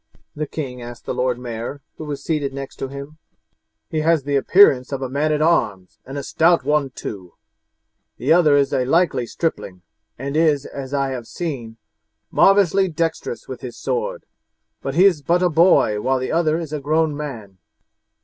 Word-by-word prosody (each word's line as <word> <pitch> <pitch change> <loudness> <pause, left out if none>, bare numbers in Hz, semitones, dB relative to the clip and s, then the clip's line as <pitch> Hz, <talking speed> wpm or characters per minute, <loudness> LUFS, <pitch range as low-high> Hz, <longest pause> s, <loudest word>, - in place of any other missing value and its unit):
the 150 0 -3
king 130 -5 -6
asked 120 0 -10
the - - -2
Lord 125 -1 0
Mayor, 120 +3 -6 0.2
who 155 - -7
was 145 -2 -5
seated 145 -4 -2
next 135 -1 -7
to 135 - -4
him; 140 +3 -9 0.7
"he 155 - -2
has 160 -1 +2
the 140 +1 -1
appearance 135 -3 +5
of 135 -1 -3
a 130 - -3
man 145 +4 0
at 150 0 +1
arms, 105 - 0
and 135 +2 -6
a 140 - -4
stout 165 -1 +3
one 150 -1 +1
too; 95 -8 -8 0.8
the 140 +6 +3
other 160 -4 +5
is 140 -1 +1
a 130 - +2
likely 135 -3 +1
stripling, 95 - -4 0.3
and 140 +3 -4
is, 155 -3 +2
as 135 -1 -7
I 140 -1 0
have 125 -3 -5
seen, 125 -10 -5 0.5
marvellously 195 -1 +4
dexterous 170 - -3
with - - -7
his - - -8
sword, - - -3 0.6
but 135 0 -4
he 180 +4 +6
is 175 -7 +4
but 175 +5 +1
a 180 - +4
boy 155 - +4
while 130 +3 +1
the 130 0 -3
other 160 -1 +2
is 160 -3 -6
a 150 - -2
grown 155 +1 +1
man. 115 -10 -7
145 Hz, 185 wpm, -21 LUFS, 130-165 Hz, 0.8 s, he